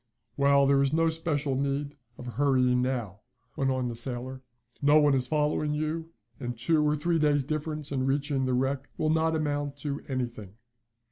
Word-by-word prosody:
"Well, 140 +1 +4
there 140 0 +4
is 140 +1 +1
no 165 +1 +3
special 155 -4 -1
need 140 +1 -2 0.2
of 125 - -9
hurrying 125 -1 +2
now," 120 -7 -2 0.4
went 135 -1 0
on 130 -1 0
the 120 - -4
sailor. 130 +2 -3 0.4
"No 145 +2 +5
one 145 -2 +4
is 130 -2 +1
following 150 0 0
you, 155 +2 -3 0.3
and 120 -3 -5
two 150 +6 +2
or 150 0 +2
three 165 +3 0
days 145 -2 +3
difference 150 0 -4
in 130 -1 0
reaching 140 -1 0
the 130 -1 +1
wreck 135 +2 -1
will 155 -1 +1
not 160 0 +2
amount 145 -2 -2
to 145 0 -4
anything." 120 -7 -4
140 Hz, 180 wpm, -28 LUFS, 130-150 Hz, 0.4 s, No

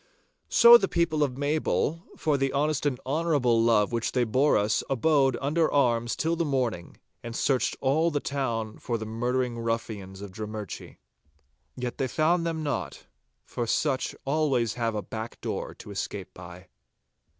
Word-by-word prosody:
So 235 0 +9
the 195 - 0
people 165 -4 0
of 135 -3 0
Maybole, 155 +2 0 0.2
for 155 -2 +1
the 135 -1 0
honest 150 +1 +1
and 130 -3 -1
honourable 140 -5 +2
love 115 -2 +3
which 115 -1 -1
they 125 - +2
bore 130 +6 +3
us, 105 +1 +1
abode 135 -1 +2
under 155 +4 +1
arms 120 -4 +2
till 165 +2 0
the 170 - 0
morning, 125 - -2 0.2
and 115 0 -7
searched 130 -2 +1
all 155 +5 +2
the 145 -3 -1
town 115 -7 -3
for 120 -2 -2
the 110 - -6
murdering 120 +2 -1
ruffians 110 -4 -4
of 100 -2 -8
Drummurchie. 105 0 -7 0.8
Yet 125 -1 -5
they 135 - +1
found 165 +6 +1
them 160 -1 -2
not, 95 - -4 0.4
for 120 - -4
such 135 +2 0
always 135 -5 +1
have 115 -2 -2
a 105 - -2
back 110 +1 -7
door - - -4
to - - -11
escape 100 -1 -5
by. 90 +1 -12
125 Hz, 160 wpm, -27 LUFS, 115-150 Hz, 0.8 s, So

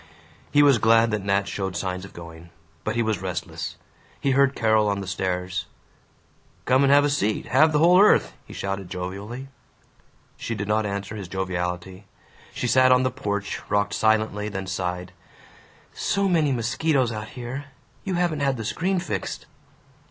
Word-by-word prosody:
He 145 0 +5
was 140 -5 +5
glad 115 +1 +4
that 105 -2 -1
Nat 100 0 +1
showed 95 -3 -3
signs 90 0 -3
of - - -13
going. 85 0 -11 0.3
But - - -2
he 115 - +2
was 110 -4 -1
restless. 95 -2 -4 0.4
He 140 - +1
heard 135 0 +3
Carol 110 -2 +3
on 100 -1 0
the 100 - -5
stairs. 90 -1 -2 1.0
"Come 130 +1 +4
have 145 +1 +6
a - - +3
seat 110 -7 0
have 155 +5 +4
the 150 - +2
whole 175 +4 +6
earth!" 210 - +4
he - - -12
shouted 95 -2 -4
jovially. 100 +8 -6 0.9
She 115 - -4
did 100 -1 -4
not 105 0 +1
answer 100 +1 -4
his 100 -4 -6
joviality. 90 +1 -4 0.5
She - - -4
sat 130 +1 +5
on 125 0 +5
the 130 - +1
porch, 100 -5 -3
rocked 100 0 +1
silently, 110 -1 +1
then 95 -2 -5
sighed, 90 -1 -3 0.8
"So 200 0 0
many 160 -6 +2
mosquitos 125 +2 +1
out 105 -1 -5
here. 125 +4 -5 0.4
You 190 -3 -2
haven't 175 -3 0
had 135 -2 +1
the 115 - -5
screen 185 - 0
fixed." 105 - -4
110 Hz, 165 wpm, -24 LUFS, 95-130 Hz, 1.0 s, have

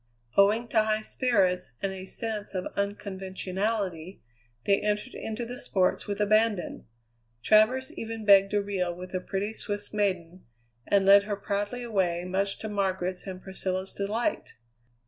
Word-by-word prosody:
Owing 210 +4 +4
to 220 - +4
high 215 0 0
spirits 190 - +1
and 195 - -1
a 190 0 -7
sense 210 0 -4
of 185 - -2
unconventionality, 195 -2 -3 0.5
they 200 0 +3
entered 210 +4 -1
into 225 +2 -4
the 245 +2 -7
sports 185 -2 0
with 205 0 -3
abandon. 215 - +1 0.6
Travers 225 +5 +4
even 225 -1 -6
begged 195 0 +6
a 205 - +2
reel 185 -4 -2
with 180 +1 -9
a 185 - 0
pretty 195 +3 -3
Swiss 205 -1 -5
maiden, 185 -4 -1 0.4
and 200 -1 +3
led 200 +1 +7
her 205 -1 -2
proudly 205 +4 -3
away, 185 -7 0
much 195 +2 0
to 220 - -6
Margaret's 190 -3 -1
and 185 -1 -7
Priscilla's 190 0 -3
delight. 220 +9 -2
200 Hz, 145 wpm, -28 LUFS, 190-215 Hz, 0.6 s, led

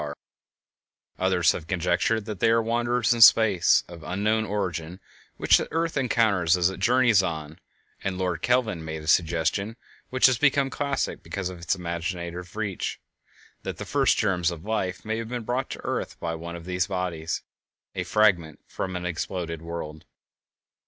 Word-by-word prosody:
Others - - +3
have 80 - -6
conjectured 95 +5 0
that 105 -4 -6
they - - +3
are 115 0 +4
wanderers 120 +1 +1
in 120 - -2
space, 110 -5 +6
of 85 -1 -11
unknown 105 +6 0
origin, 95 -4 -3 0.4
which - - +5
the - - -4
earth 165 +1 -1
encounters 110 - +2
as 90 +1 +2
it 95 - -8
journeys 120 -1 +4
on, 80 -4 -5 0.4
and 95 -1 -2
Lord 90 -2 -2
Kelvin 115 -9 +1
made 80 0 -6
a - - -10
suggestion 85 +6 +1 0.3
which 130 0 +3
has 130 -2 +5
become 140 -2 +3
classic 140 -2 -2
because 95 -2 -4
of 90 -2 -9
its 85 - 0
imaginative 85 0 -5
reach—viz., 105 -4 -3 0.6
that - - -5
the - - -6
first - - +2
germs 90 -2 +1
of 85 0 -7
life 95 -4 -2
may 110 +1 -2
have 115 -1 -5
been 120 -1 -4
brought 125 +4 -2
to - - -5
the - - -13
earth - - -3
by 85 -1 -3
one 85 +1 -6
of 85 -1 -9
these 90 0 -1
bodies, 90 -4 -3 0.5
"a - - -2
fragment 90 -8 +2 0.2
of 95 -1 -3
an 90 0 -4
exploded 85 -1 -4
world." 80 -2 -7
95 Hz, 170 wpm, -26 LUFS, 85-115 Hz, 0.6 s, space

